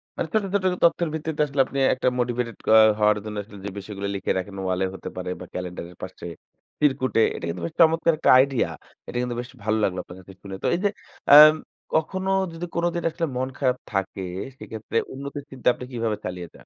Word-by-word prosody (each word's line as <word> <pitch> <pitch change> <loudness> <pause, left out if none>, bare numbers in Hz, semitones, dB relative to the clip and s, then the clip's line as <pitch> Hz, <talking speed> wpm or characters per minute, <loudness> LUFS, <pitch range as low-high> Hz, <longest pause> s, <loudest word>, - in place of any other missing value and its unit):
মানে - - -2
ছোট, 215 -1 +2
ছোট 200 -2 +1 0.2
তথ্যের 170 0 +3
ভিত্তিতে 160 -1 -2
আসলে 140 -1 -5
আপনি 140 - -7 0.2
একটা 130 - -1
মোটিভেটেড 120 -2 -1 0.2
অ - - +9 0.2
হওয়ার 105 0 +4
জন্য 105 0 -5
আসলে 100 0 -14
যে - - -2
বিষয়গুলো 100 0 -6
লিখে 100 - -1
রাখেন 95 +1 -5
ওয়ালে 95 0 0
হতে 95 - -7
পারে 90 0 -4
বা 90 - -8
ক্যালেন্ডারের 90 -1 -6
পাশে, 95 -1 -8 0.5
চিরকুটে 130 -5 +2
এটা - - -5
কিন্তু 85 +1 -5
বেশ - - -5
চমৎকার 165 0 +4
একটা - - +1
আইডিয়া। 130 -2 +3 0.4
এটা - - -5
কিন্তু 125 -1 -3
বেশ 125 - -10
ভালো 110 +1 +1
লাগলো 95 -2 0
আপনার 90 - -12
কাছে 95 +1 -13
শুনে। 100 -1 -7
তো - - +1
এই - - -2
যে 205 - +4 0.5
আম 155 +1 +11 0.4
কখনো 190 +4 0 0.2
যদি 165 +1 -5
কোনদিন 170 0 0
আসলে 165 +1 -2
মন 130 +1 -1
খারাপ 130 -2 +1 0.2
থাকে 95 0 -2 0.3
সেইক্ষেত্রে 110 -1 -5 0.2
উন্নতির 140 +1 -7
চিন্তা 130 -2 -6
আপনি 125 - -9
কিভাবে 115 -3 -1
চালিয়ে 90 -1 -5
যান? - - -17
125 Hz, 200 wpm, -24 LUFS, 95-150 Hz, 0.5 s, আম